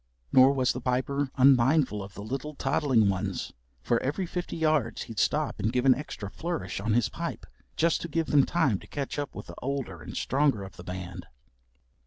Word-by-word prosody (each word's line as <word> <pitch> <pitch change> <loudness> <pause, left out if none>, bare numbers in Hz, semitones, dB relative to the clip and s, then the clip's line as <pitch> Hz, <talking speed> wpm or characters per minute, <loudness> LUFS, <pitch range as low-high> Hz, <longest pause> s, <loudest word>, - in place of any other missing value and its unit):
Nor 130 +1 +7
was 130 -2 +2
the 125 - -5
Piper 135 +3 0
unmindful 130 -3 +4
of 100 0 -9
the 100 - -7
little 135 +6 -4
toddling 130 -8 +2
ones, 95 -1 -2 0.3
for 120 - +1
every 145 +8 -1
fifty 180 0 -4
yards 155 -6 +1
he'd 110 -2 -6
stop 150 -6 +1
and 105 +2 0
give 125 +1 0
an 130 - +8
extra 125 -6 -6
flourish 150 - -4
on 105 +2 0
his 120 -1 +3
pipe - - -5 0.3
just 165 0 +2
to - - -4
give 165 +1 0
them 145 -2 +4
time 135 - +1
to - - -15
keep 140 0 -4
up 145 - -4
with - - -7
the - - -10
older 130 - -3
and 75 - -7
stronger 135 -6 +1
of 95 - -10
the 85 - -10
band. 90 0 -7
130 Hz, 200 wpm, -28 LUFS, 110-145 Hz, 0.3 s, an